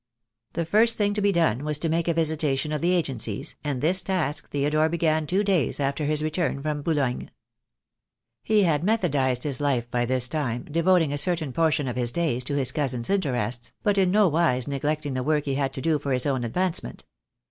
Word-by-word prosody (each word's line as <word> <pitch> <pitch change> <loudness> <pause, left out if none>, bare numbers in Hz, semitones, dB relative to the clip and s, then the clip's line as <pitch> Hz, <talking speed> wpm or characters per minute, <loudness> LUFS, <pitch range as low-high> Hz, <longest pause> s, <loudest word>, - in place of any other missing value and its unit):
The 170 0 -2
first 220 +7 +3
thing 205 -1 +1
to 210 - -1
be 200 0 +3
done 160 - +1
was 150 -1 0
to 165 - -2
make 165 +1 0
a 170 - +2
visitation 155 -3 0
of 150 - -2
the 175 +2 +2
agencies, 125 - -2
and 140 -4 -3
this 180 +4 +3
task 165 -6 -2
Theodore 150 +2 +1
began 160 -2 0
two 190 +5 +1
days 185 -11 0
after 140 +2 -1
his 150 +1 +1
return 155 -1 -1
from 150 -1 -2
Boulogne. 140 -5 -1 1.1
He 215 -2 +2
had 160 -4 +1
methodized 145 - +1
his 145 -3 -2
life 125 -4 -1
by 120 -1 0
this 130 0 +2
time, 130 -5 -3
devoting 165 -1 +2
a 145 - +4
certain 160 -3 0
portion 155 -2 +1
of 125 - -4
his 120 -1 +1
days 140 -7 -1
to 145 - 0
his 135 -4 +2
cousin's 130 -4 -2
interests, 125 - -2
but 205 -1 +2
in 185 -2 +3
no 205 +1 +4
wise 155 -7 +1
neglecting 145 +1 -2
the 130 - -2
work 150 +2 0
he 140 - -1
had 135 0 -1
to 130 - -4
do 160 -2 +1
for 140 -1 -2
his 125 -1 0
own 135 -4 0
advancement. 160 - -3
150 Hz, 205 wpm, -25 LUFS, 135-170 Hz, 1.1 s, a